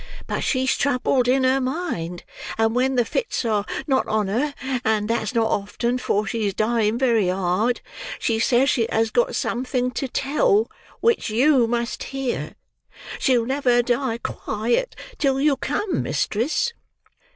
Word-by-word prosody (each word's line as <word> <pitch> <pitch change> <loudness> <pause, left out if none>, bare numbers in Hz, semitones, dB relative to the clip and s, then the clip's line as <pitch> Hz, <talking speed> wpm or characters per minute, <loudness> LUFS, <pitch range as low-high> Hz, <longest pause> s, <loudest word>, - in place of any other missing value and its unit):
But - - -2
she's 260 -1 +1
troubled 255 -2 +1
in 260 +1 +3
her 260 +1 +3
mind: 255 - -3 0.3
and 225 0 +2
when 260 +2 +1
the 245 -2 +3
fits 460 - -2
are 210 -3 +1 0.2
not 265 -4 +1
on 215 -2 0
her,—and 245 -3 -1
that's 230 +1 -1
not 225 -1 +2
often, 235 +5 -1
for 210 -3 0
she 220 -2 -1
is 195 - -3
dying 220 0 +1
very 235 -6 +2
hard,—she 195 +4 -1
says 245 +3 +3
she 230 -3 +1
has 225 0 +1
got - - +1
something 250 0 -1
to 270 - -3
tell, 400 - +1 0.3
which 465 - +2
you 250 +2 +4
must 235 +1 -2
hear. 270 -2 -3 0.6
She'll 245 -4 +2
never 250 -2 +2
die 240 -1 0
quiet 235 - -2 0.2
till 270 -2 +2
you 290 0 +3
come, 370 +9 -1
mistress." 300 - 0
245 Hz, 145 wpm, -23 LUFS, 225-270 Hz, 0.6 s, you